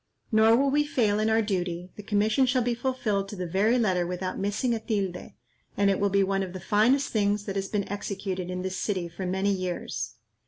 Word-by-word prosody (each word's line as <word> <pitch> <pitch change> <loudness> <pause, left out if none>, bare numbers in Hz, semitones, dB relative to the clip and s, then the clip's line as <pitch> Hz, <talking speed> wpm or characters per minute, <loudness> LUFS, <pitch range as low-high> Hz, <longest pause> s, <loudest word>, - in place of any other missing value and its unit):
Nor 220 +1 +6
will 275 +1 +2
we 295 +1 +3
fail 220 -8 +1
in 215 +1 +2
our 220 0 +3
duty; 180 -3 -2
the - - -8
commission 215 +5 +2
shall 250 0 +2
be 240 0 +1
fulfilled 230 -5 -1
to 205 - -6
the 180 -2 -4
very 200 +8 +2
letter 185 -7 +1
without 180 +1 -3
missing 205 +5 0
a 225 - -1
tilde, 195 -5 -3 0.4
and 200 -1 +4
it 195 - 0
will 200 - +2
be 200 0 +3
one 195 0 0
of 185 -2 -4
the 185 - -6
finest 230 +9 +2
things 205 -1 +1
that 195 - -4
has 195 0 -1
been 205 -1 -2
executed 195 -2 -4
in 180 0 -3
this 190 0 -3
city 185 -5 -1
for 175 +2 -6
many 190 +2 +1
years. 175 -11 -4
200 Hz, 225 wpm, -27 LUFS, 185-220 Hz, 0.4 s, Nor